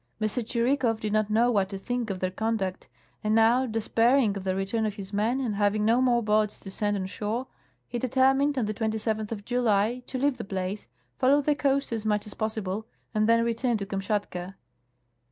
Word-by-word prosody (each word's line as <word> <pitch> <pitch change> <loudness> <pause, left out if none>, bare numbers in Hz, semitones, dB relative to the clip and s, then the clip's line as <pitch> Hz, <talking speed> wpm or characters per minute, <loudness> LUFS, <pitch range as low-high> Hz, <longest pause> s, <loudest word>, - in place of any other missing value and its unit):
M. 215 - +1
Tschh'ikow 235 +1 0
did 210 -1 -3
not 215 -1 +2
know 230 +3 +3
what 195 -4 +1
to 195 - -5
think 245 +3 -3
of 195 - -2
tlieir 185 0 -3
conduct, 220 -4 -2 0.4
and 215 +1 +2
now, 235 +4 +4
despairing 225 +1 +2
of 200 - -5
the 190 -1 -1
return 195 +4 -1
of 210 - -4
his 200 0 -8
men 220 +6 +1
and 245 -5 -1
having 205 +1 +1
no 230 +3 +4
more 240 -2 +3
boats 210 0 +1
to 195 - -8
send 205 +1 0
on 190 - -3
shore, 215 +6 -3 0.4
he 240 - -3
determined, 270 +3 +2
on 245 - +1
tlie 215 - -2 0.2
27tli 220 0 -2
of 205 -3 -5
July, 240 -1 +1
to 260 - -4
leave 275 0 +1
the - - -5
place, 195 - -4 0.3
follow 275 +3 +5
the 295 +1 +2
coast 275 -2 0
as 225 -2 -2
much 210 -1 0
as 210 - -8
possi 220 -1 -2
ble, 200 +4 -4 0.3
and 215 0 +2
then 230 0 +4
return 235 0 0
to 200 - -4
Kamshatka. 195 -2 -3
220 Hz, 210 wpm, -27 LUFS, 205-245 Hz, 0.4 s, follow